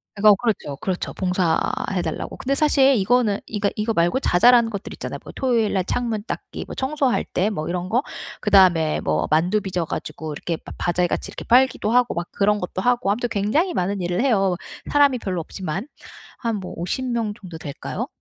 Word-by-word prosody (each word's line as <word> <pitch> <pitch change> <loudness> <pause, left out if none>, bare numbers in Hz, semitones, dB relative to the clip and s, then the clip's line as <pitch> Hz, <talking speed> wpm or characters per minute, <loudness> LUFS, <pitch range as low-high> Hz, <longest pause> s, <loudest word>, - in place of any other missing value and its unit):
그래서 210 0 +6
그렇죠, 205 - -1
그렇죠. 185 -2 -3
봉사해 180 0 0
달라고. - - -4
근데 275 +2 -1
사실 275 -2 +4
이거는 215 0 +2
그러니까 205 -2 -1
이거 215 +1 -1
말고 175 +9 +2
자잘한 235 +5 +5
것들 200 -1 -6
있잖아요. - - -6
뭐 - - -9
토요일 235 -5 +1
날 190 -2 +1
창문 225 -3 -2
닦기 - - -6
뭐 - - -8
청소할 270 -1 0
때 195 +4 0
뭐 155 -7 -4
이런 180 +1 -3
거? 245 +4 +2 0.4
그다음에 180 -6 +4
뭐 80 0 0
만두 175 +7 +2
빚어 180 -3 -2
가지고 155 0 -5
이렇게 165 +3 -3
바 - - -12
바자회 175 0 +1
같이 - - -3
이렇게 - - -8
팔기도 245 -3 +3
하고 245 -1 +3
막 170 0 -3
그런 205 +1 +2
것도 180 +1 -4
하고 240 -3 +2
아무튼 240 +3 -1
굉장히 260 - +1
많은 190 +1 -1
일을 175 +4 -1
해요, 195 -9 +2 0.4
사람이 285 -4 +4
별로 185 -5 -3
없지만. 190 - -5 0.5
한 230 -3 -1
뭐 185 - -7
50 180 +10 -2
명 230 -4 -1
정도 175 -5 -9
될까요? 145 -3 -5
205 Hz, 400 characters per minute, -22 LUFS, 180-240 Hz, 0.5 s, 그래서